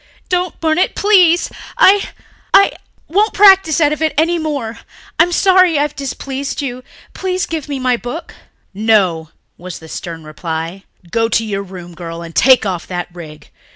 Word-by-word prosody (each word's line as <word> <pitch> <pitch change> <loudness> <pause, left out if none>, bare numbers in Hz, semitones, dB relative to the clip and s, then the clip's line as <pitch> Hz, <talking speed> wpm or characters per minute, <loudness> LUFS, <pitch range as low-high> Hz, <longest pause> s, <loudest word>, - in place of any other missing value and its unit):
"Don't 360 -1 -1
burn 315 0 +1
it, 370 - +1
please. 365 -5 +4 0.3
I... 395 +1 +5 0.5
I... 395 - +6 0.4
won't 410 +6 +1
practise 385 -6 +6
out 300 -2 +3
of 305 - -6
it 315 -1 0
any 335 +2 +2
more. 280 -8 -4 0.4
I'm 340 +2 +4
sorry 370 -3 +4
I've 295 0 -1
displeased 275 0 -5
you. 255 -3 -5 0.3
Please 370 -1 -2
give 315 -3 -5
me 280 - -2
my 255 -2 +1
book." 245 +8 -7 0.4
"No," 190 -7 +1 0.3
was 180 0 -8
the 160 - -13
stern 165 0 -7
reply. 165 +4 -6 0.3
"Go 225 +2 +1
to 225 0 +1
your 200 -2 -3
room, 180 -3 -10
girl, 170 0 -7
and 165 0 -10
take 260 - +5
off 180 -3 -3
that 175 -1 -4
rig. 155 -3 -12
265 Hz, 165 wpm, -16 LUFS, -, 0.5 s, I